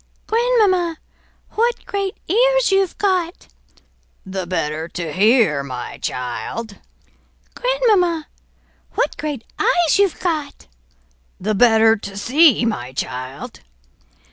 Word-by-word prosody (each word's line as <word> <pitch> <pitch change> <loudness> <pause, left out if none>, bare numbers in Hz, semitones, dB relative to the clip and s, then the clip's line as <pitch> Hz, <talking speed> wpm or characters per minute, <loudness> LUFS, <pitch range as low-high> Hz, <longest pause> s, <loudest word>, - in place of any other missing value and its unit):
"Grandmamma, 425 -8 +2 0.5
what 470 +2 0
great 395 -1 -3
ears - - +3
you've 390 -2 +1
got!" 370 -4 -1 0.8
"The 190 -1 -5
better 160 -2 -2
to 170 -3 -5
hear, 210 - +3
my 125 -3 -7
child!" 195 - -5 0.8
"Grandmamma, 420 -11 +1 0.7
what - - 0
great 290 -6 -4 0.2
eyes 350 -6 +3
you've 395 -5 +2
got!" 310 -5 -3 0.7
"The 215 +3 -1
better 225 0 +5
to 200 -1 -9
see, 260 +2 +4
my 130 - -3
child." 130 +1 -6
295 Hz, 100 wpm, -20 LUFS, -, 0.8 s, better